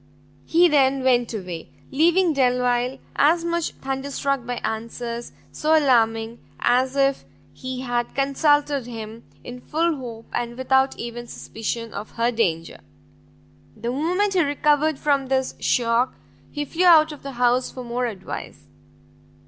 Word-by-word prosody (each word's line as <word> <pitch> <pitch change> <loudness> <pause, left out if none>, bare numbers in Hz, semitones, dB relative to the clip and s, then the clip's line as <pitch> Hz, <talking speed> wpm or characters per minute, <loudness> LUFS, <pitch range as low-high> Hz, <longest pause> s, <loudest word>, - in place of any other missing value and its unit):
He 345 +2 +5
then 275 -3 +3
went 245 -2 +2
away; 180 -7 -6 0.2
leaving 335 +4 +3
Delvile 250 -1 +1 0.2
as 330 +4 +3
much 340 -1 -1
thunderstruck 270 -1 -2
by 245 - -2
answers 230 +2 -4 0.2
so 315 +1 +2
alarming, 230 -5 +2 0.2
as 255 +2 +2
if 275 -1 +2 0.3
he 255 0 -6
had 240 -2 -2
consulted 285 -1 +2
him 225 -1 -8 0.2
in 245 0 -9
full 330 +4 0
hope, 230 -3 -8
and 240 0 -3
without 265 +1 +2
even 240 0 -6
suspicion 230 0 -5
of 205 +2 -7
her 235 +1 +1
danger. 170 -8 -1 1.0
The 235 +2 -3
moment 360 +9 0
he 365 - +3
recovered 295 0 +2
from 280 -2 +1
this 265 0 0
shock, 240 +1 +1 0.3
he 295 0 -4
flew 335 +5 0
out 320 -3 +7
of 300 - -10
the 275 -1 -7
house 245 +1 +2
for 255 - -8
more 245 +1 -2
advice. 195 -5 -7
260 Hz, 140 wpm, -23 LUFS, 235-290 Hz, 1.0 s, out